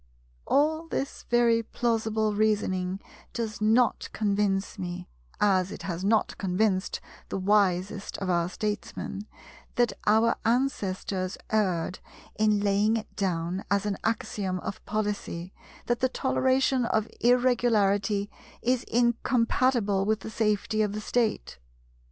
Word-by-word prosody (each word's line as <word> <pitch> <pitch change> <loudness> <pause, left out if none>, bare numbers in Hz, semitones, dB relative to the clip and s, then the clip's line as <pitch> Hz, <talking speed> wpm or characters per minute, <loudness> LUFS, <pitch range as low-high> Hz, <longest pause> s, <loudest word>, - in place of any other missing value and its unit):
All 315 +3 +2
this 275 -3 -4
very 235 -1 +4
plausible 220 -2 0
reasoning 195 -3 0 0.3
does 220 -3 -4
not 225 +3 +3
convince 200 -2 0
me, 180 -1 -5 0.3
as 190 -2 +3
it - - -8
has 175 -1 -4
not 215 +2 +1
convinced 190 0 0 0.3
the - - -2
wisest 195 0 +1
of 195 - -4
our 175 -1 +1
Statesmen, 210 +1 -4 0.5
that 240 -1 +2
our 220 +2 +4
ancestors 200 -6 -1
erred 185 -5 0 0.3
in 215 -1 +2
laying 205 +2 +2
it 220 - -8
down 180 -1 -1
as 200 0 +1
an 205 -1 0
axiom 205 -4 -1
of 195 - -6
policy 205 -4 -3 0.3
that 240 -1 0
the 260 - +2
toleration 260 0 +1
of 220 -1 0
Irregularity 220 -5 +2 0.4
is 250 +1 +1
incompatible 235 -3 +2
with 215 -1 +1
the 220 - -7
safety 215 0 0
of 210 -1 0
the 215 - -3
State. 220 - -1
210 Hz, 120 wpm, -27 LUFS, 195-230 Hz, 0.5 s, very